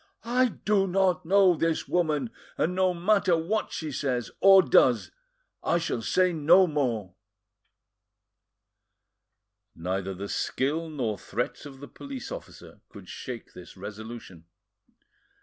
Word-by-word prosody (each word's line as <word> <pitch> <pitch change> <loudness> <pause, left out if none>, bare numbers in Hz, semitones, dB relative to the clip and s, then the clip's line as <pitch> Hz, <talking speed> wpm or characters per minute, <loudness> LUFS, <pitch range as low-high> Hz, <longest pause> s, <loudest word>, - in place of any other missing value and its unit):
I 250 +2 +3
do 210 -3 0
not 185 -2 +1
know 195 -1 +5
this 165 -1 -1
woman, 155 -8 0 0.3
and 175 - 0
no 185 0 +2
matter 180 0 +2
what 200 +7 -2
she 155 -2 -4
says 125 -3 -2
or 195 -1 +7
does, - - +3 0.5
I - - +2
shall 165 -8 -2
say 185 +9 +2
no 165 +4 +5
more." 120 - -2 2.6
Neither 95 +3 -3
the 100 +2 -6
skill 155 +10 -2
nor 120 -9 -3
threats 120 +6 -4
of 135 -1 -13
the 145 - -8
police 275 - -8
officer - - -10
could - - -13
shake 125 -3 -8
this 90 0 -13
resolution. 105 -3 -9
160 Hz, 125 wpm, -27 LUFS, 120-185 Hz, 2.6 s, or